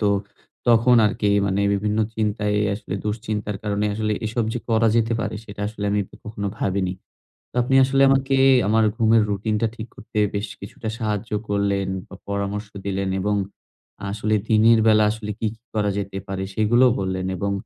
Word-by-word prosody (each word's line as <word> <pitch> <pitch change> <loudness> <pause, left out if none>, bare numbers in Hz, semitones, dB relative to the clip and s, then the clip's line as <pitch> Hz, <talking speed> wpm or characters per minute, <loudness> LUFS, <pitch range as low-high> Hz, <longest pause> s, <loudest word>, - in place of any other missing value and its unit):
তো 105 - +2 0.6
তখন 120 +1 +5
আরকি 105 0 0 0.2
মানে 100 +1 0
বিভিন্ন 105 +2 -1 0.2
চিন্তায় 105 -1 0 0.2
আসলে 100 -2 -6
দুশ্চিন্তার 105 -1 -3
কারণে 105 0 0
আসলে 110 0 -1
এসব 115 +1 -1
যে 120 - -2
করা 115 0 +3
যেতে 115 0 +2
পারে, - - -3
সেটা 105 -1 -10
আসলে 105 -2 -6
আমি 105 0 +1
ক - - -43
কখনো 105 -1 -4
ভাবিনি। 95 -1 0 0.6
তো - - -59
আপনি 130 +2 0
আসলে 135 +1 +2
আমারকে 135 0 +2 0.3
আমার 110 +1 +4
ঘুমের 110 -1 +4
রুটিন 105 +2 -1
টা - - +4
ঠিক 110 0 -6
করতে, 110 0 -6 0.2
বেশ 100 +1 -1
কিছুটা 100 +3 -7
সাহায্য 110 -1 -2 0.2
করলেন, 100 -1 0 0.2
বা - - -11
পরামর্শ 100 +1 -3 0.2
দিলেন। 95 -1 -1
এবং 105 +2 0 0.8
আসলে 110 +1 -1
দিনের 115 +1 +5
বেলা 110 -1 +5
আসলে 105 -1 -5
কি, 110 - -1
কি 115 - -38
করা 105 -1 +1
যেতে 95 -1 -4
পারে? 95 0 -4
সেগুলোও 120 +4 +4
বললেন 95 -1 -2
এবং 100 +2 -1
105 Hz, 175 wpm, -22 LUFS, 100-110 Hz, 0.8 s, তখন